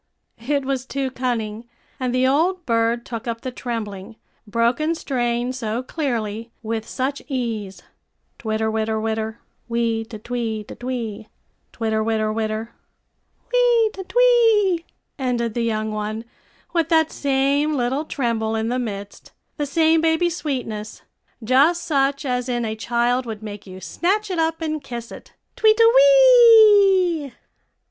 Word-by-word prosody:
It 285 -2 0
was 265 -1 -2
too 270 -1 -2
cunning, 235 -3 -3 0.3
and 255 -2 -1
the 255 0 +2
old 340 +6 +1
bird 230 0 +1
took 230 -1 -6
up 230 -1 -3
the 255 - -5
trembling, 220 -4 -6 0.3
broken 235 +9 +1
strain 245 -4 -1
so 235 -1 -3
clearly, 230 -7 -3
with 225 0 -3
such 275 +2 -2
ease, 230 -8 -4 0.6
"Twitter, 220 -1 -1
witter, 220 0 -1
witter 220 0 -3 0.3
wee 230 -1 0
te 225 0 -9
twee 225 -1 -3
te - - -10
twee 235 -4 -5 0.4
twitter, 220 -1 -1
witter, 215 -1 0
witter" 220 +1 -3 0.8
"Wee 480 -3 +4
te 380 - -7
twee," 450 -7 +3 0.3
ended 240 -3 -1
the 235 - -2
young 220 -1 -1
one, 215 +2 -4 0.5
with 335 -2 +1
that 320 -2 +3
same 280 +2 +1
little 260 +3 0
tremble 230 -6 -1
in 220 +1 -1
the 250 +1 -1
midst, 205 -4 -7 0.3
the 295 -2 -2
same 320 +2 +3
baby 325 +2 +2
sweetness, 245 -10 -5 0.4
just 280 +9 +3
such 275 -1 0
as 250 -1 -1
in 240 -1 -1
a 220 0 -3
child 240 +2 0
would 220 -1 -6
make 205 -1 -8
you 185 0 -9
snatch 395 - -1
it 355 - -2
up 325 0 0
and 310 -2 -3
kiss 235 -3 -7
it - - -12 0.2
"twee 435 0 +4
te 460 - +4
wee." 435 - +6
245 Hz, 145 wpm, -22 LUFS, 225-315 Hz, 0.8 s, wee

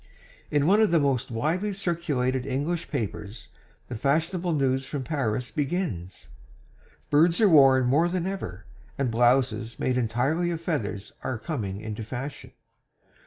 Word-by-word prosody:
In 145 -1 +2
one 200 +6 +5
of 215 - +4
the 170 - +4
most 135 -3 0
widely 165 - -1
circulated 150 - -1
English 145 +6 -2
papers 105 - -5 0.4
the - - -6
fashionable 165 - 0
news 135 -3 +1
from 135 0 -4
Paris 125 -4 -2
begins: 140 - -3 0.8
"Birds 165 +4 +4
are 220 - +6
worn 135 -6 +6
more 150 +8 +3
than 180 -1 -2
ever, 105 - -5 0.3
and 135 -4 0
blouses 120 -1 +2
made 125 -1 0
entirely 130 +9 0
of 170 -2 -2
feathers 110 - -3
are 130 - -3
coming 110 - -4
into 110 0 -5
fashion." 130 +5 -6
135 Hz, 140 wpm, -26 LUFS, 120-165 Hz, 0.8 s, are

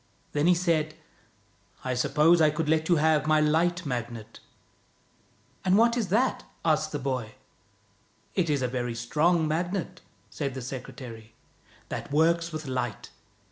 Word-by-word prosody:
Then 150 +3 +1
he 180 - +6
said: 160 -3 0 0.4
" - - -33
I 130 - 0
suppose 150 +7 +4
I 155 - +6
could 155 +1 -2
let 160 +1 +1
you 175 - +5
have 155 -1 +2
my 155 0 +4
Light 170 +4 +2
Magnet." 120 -4 -5 0.6
" - - -37
And 190 +1 +4
what 235 +1 +4
is 230 -5 -1
that? 230 +8 +1
" - - -22
asked 155 -1 +2
the 145 - -2
boy. 130 -5 -3 1.0
"It 170 -4 0
is 145 -3 +1
a - - +1
very 120 -1 -3
strong 155 +8 +2
Magnet," 175 +3 -2 0.3
said 140 -3 -3
the 130 - -5
secretary, 120 -3 -8 0.3
" - - -29
that - - -5
works 165 +3 +2
with 155 -1 -5
light. 130 -5 -4
155 Hz, 165 wpm, -27 LUFS, 130-170 Hz, 1.0 s, he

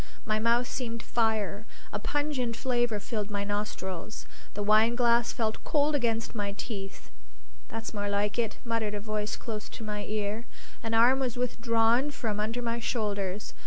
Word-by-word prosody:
My 215 0 +1
mouth 235 +2 +3
seemed 230 -3 -3
fire; 220 -2 0 0.3
a 205 - -1
pungent 275 -2 0
flavor 240 -4 +1
filled 210 -1 -3
my 200 -1 -1
nostrils; 205 -1 -3 0.3
the 205 - -1
wineglass 235 +3 +4
felt 220 -2 -1
cold 295 0 +2
against 230 -5 +1
my 205 -3 -2
teeth. 200 -2 -6 0.6
"That's 225 0 -5
more 205 -1 -1
like 205 +2 +1
it!" 225 -2 0
muttered 225 -3 0
a - - -2
voice 210 0 -2
close 215 -3 -5
to - - -8
my 210 -1 -3
ear. 215 +2 -2 0.3
An 225 0 -1
arm 245 +4 +6
was 250 -3 -1
withdrawn 235 +1 +3
from 225 -7 -2
under 225 +3 -1
my 235 0 0
shoulders. 205 -4 -1
225 Hz, 160 wpm, -30 LUFS, 210-235 Hz, 0.6 s, arm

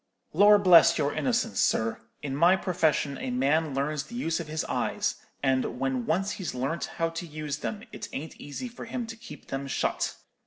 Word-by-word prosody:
Lor' 205 +5 +7
bless 180 -4 +7
your 145 -2 +1
innocence, 240 -3 0
sir; 110 0 +1 0.2
in 135 -2 -3
my 170 +5 +5
profession 160 -6 0
a - - -3
man 140 +4 +1
learns 145 +2 0
the 240 - -10
use 165 -9 -1
of 165 - -5
his 155 0 -2
eyes; - - -1 0.3
and 130 -2 +1
when 130 -2 -1
once 190 +6 +1
he's 185 -8 -4
learnt 135 +7 -1
how 165 0 +1
to 165 +1 -6
use 150 -2 -4
them, 215 +6 -4
it - - -7
ain't 155 +4 -6
easy 145 - -6
for 240 - -9
him 240 +1 -4
to 225 0 -7
keep 235 +1 -12
them 135 +1 -3
shut. - - -1
160 Hz, 195 wpm, -28 LUFS, 140-195 Hz, 0.3 s, Lor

